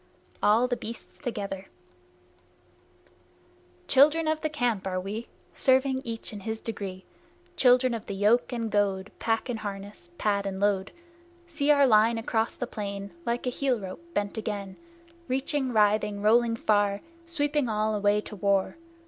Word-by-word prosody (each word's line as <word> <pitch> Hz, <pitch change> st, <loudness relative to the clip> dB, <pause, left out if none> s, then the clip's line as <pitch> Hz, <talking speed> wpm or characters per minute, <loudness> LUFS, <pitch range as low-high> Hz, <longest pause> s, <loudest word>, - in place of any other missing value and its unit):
ALL 225 Hz, +4 st, +4 dB
THE 245 Hz, -, 0 dB
BEASTS 230 Hz, +2 st, -9 dB
TOGETHER 200 Hz, -6 st, -4 dB, 2.2 s
Children 305 Hz, +4 st, +5 dB
of 310 Hz, 0 st, 0 dB
the 310 Hz, -, -1 dB
Camp 245 Hz, -10 st, -1 dB
are 185 Hz, -1 st, -1 dB
we, 205 Hz, +5 st, -5 dB, 0.3 s
Serving 265 Hz, 0 st, +2 dB
each 225 Hz, -1 st, -5 dB
in 205 Hz, -, -6 dB
his 220 Hz, +2 st, -4 dB
degree; 195 Hz, -5 st, -6 dB, 0.5 s
Children 255 Hz, -1 st, +4 dB
of 225 Hz, -2 st, -5 dB
the 200 Hz, -, -4 dB
yoke 210 Hz, +7 st, +3 dB
and 230 Hz, -3 st, -3 dB
goad, 200 Hz, -1 st, 0 dB
Pack 225 Hz, +1 st, 0 dB
and 240 Hz, -3 st, -3 dB
harness, 200 Hz, -3 st, -7 dB
pad 200 Hz, -1 st, 0 dB
and 190 Hz, -1 st, -4 dB
load. 200 Hz, -1 st, +1 dB, 0.5 s
See 315 Hz, -4 st, -2 dB
our 285 Hz, -1 st, +6 dB
line 225 Hz, -1 st, +4 dB
across 225 Hz, 0 st, -1 dB
the 245 Hz, -, -3 dB
plain, 200 Hz, -3 st, -5 dB, 0.2 s
Like 235 Hz, +2 st, -1 dB
a 250 Hz, -, 0 dB
heel 255 Hz, -2 st, 0 dB
rope 190 Hz, -, -7 dB
bent 205 Hz, +2 st, -1 dB
again, 200 Hz, -3 st, -4 dB, 0.5 s
Reaching, 265 Hz, +1 st, -1 dB
writhing, 210 Hz, -2 st, +2 dB
rolling 230 Hz, +2 st, +4 dB
far, 205 Hz, -2 st, +1 dB, 0.3 s
Sweeping 295 Hz, -5 st, 0 dB
all 215 Hz, 0 st, 0 dB
away 205 Hz, 0 st, +2 dB
to 210 Hz, -, -9 dB
war! 200 Hz, -, +1 dB
220 Hz, 150 wpm, -27 LUFS, 200-250 Hz, 2.2 s, our